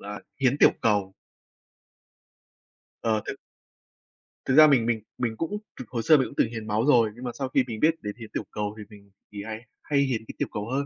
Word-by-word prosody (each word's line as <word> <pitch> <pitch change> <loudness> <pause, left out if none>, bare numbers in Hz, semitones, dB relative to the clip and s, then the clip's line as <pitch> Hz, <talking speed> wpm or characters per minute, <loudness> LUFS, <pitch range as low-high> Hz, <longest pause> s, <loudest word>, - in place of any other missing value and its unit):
là 105 +1 -7 0.2
hiến 135 +2 +2
tiểu - - +7
cầu. 100 -4 +1 1.9
Ờ, 110 -2 +1
thực - - -4 1.1
Thực 130 - +1
ra 155 0 +9
mình 125 -6 +4
mình 115 -2 +1 0.2
mình 115 -2 -2
cũng 200 +6 -2 0.2
thực 125 - -8
hồi 115 -2 -3
xưa 155 +5 +7
mình 130 - +1
cũng - - -12
từng 115 - +3
hiến 110 -2 -6
máu 110 +3 +1
rồi, 120 -6 +5
nhưng 125 - -11
mà 120 - -3
sau 135 -2 -4
khi 135 -1 +3
mình 110 -2 -5
biết 160 +1 +4
đến 105 0 -5
hiến 110 - -9
tiểu - - -2
cầu, 105 0 -3
thì 105 - -7
mình 100 -2 -16 0.2
thì 100 -1 -6
hay 110 0 -6 0.2
hay 145 -1 +1
hiến 125 -5 0
cái - - -9
tiểu - - -1
cầu 105 +2 -4
hơn. 140 +2 -1
115 Hz, 225 wpm, -26 LUFS, 105-135 Hz, 1.9 s, ra